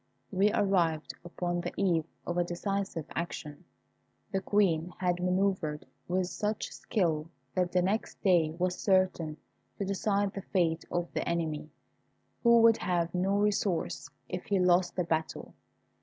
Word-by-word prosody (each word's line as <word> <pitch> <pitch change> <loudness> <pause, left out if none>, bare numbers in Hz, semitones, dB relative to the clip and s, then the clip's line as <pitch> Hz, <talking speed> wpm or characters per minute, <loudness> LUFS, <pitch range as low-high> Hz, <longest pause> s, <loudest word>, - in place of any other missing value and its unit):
We 200 +2 +3
arrived 175 -6 +1
upon 175 0 -2
the - - -4
eve 170 -5 +2 0.2
of 175 0 -1
a - - +4
decisive 185 -1 -3
action. 150 -3 -5 0.7
The 195 - 0
Queen 180 -5 +2
had 180 -1 +1
manœuvred 180 -4 0 0.2
with 185 +1 +1
such 210 +3 -3
skill 165 -6 -1 0.2
that 180 -1 +1
the 180 -1 +2
next 205 +5 -1
day 175 -5 +4
was 180 0 0
certain 185 -5 +2 0.4
to 200 - -2
decide 200 0 0
the 195 - -5
fate 170 -4 0
of 175 0 -2
the - - -1
enemy, 160 -3 -2 0.7
who 235 -1 +6
would 230 -1 +7
have 175 -2 0
no 190 +2 +1
resource 205 -3 0 0.2
if 180 - -5
he 200 - +1
lost 180 0 +3
the 180 - +1
battle. 160 -1 -2
180 Hz, 145 wpm, -30 LUFS, 170-195 Hz, 0.7 s, would